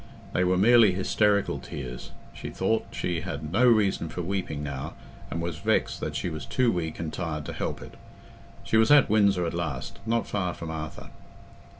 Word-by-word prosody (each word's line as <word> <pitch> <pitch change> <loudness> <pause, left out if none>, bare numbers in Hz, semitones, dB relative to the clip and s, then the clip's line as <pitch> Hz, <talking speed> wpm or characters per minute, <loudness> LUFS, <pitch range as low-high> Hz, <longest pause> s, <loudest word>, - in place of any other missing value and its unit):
They 90 - +2
were 90 0 +2
merely 110 0 +6
hysterical 100 +2 +1
tears: 65 -3 -7 0.2
she - - -7
thought 110 0 0
she 85 -2 -2
had 80 -2 -5
no 120 +7 +4
reason 105 -8 +3
for 90 - -4
weeping 90 -5 -3
now, 70 -2 -5 0.3
and 85 - -3
was 85 -2 -3
vexed - - +1
that - - -4
she - - -2
was 80 -4 -5
too 125 -2 +2
weak 80 -4 -3
and 80 -1 -4
tired 80 -3 -3
to - - -5
help - - -3
it. - - -12 0.7
She 110 - +2
was 110 0 +5
at 145 -7 +6
Windsor 100 -4 +4
at 85 - -2
last, 85 -7 -4
not 115 +1 +1
far 90 -4 -2
from 80 -1 -6
Arthur. 75 -1 -7
90 Hz, 190 wpm, -27 LUFS, 80-105 Hz, 0.7 s, merely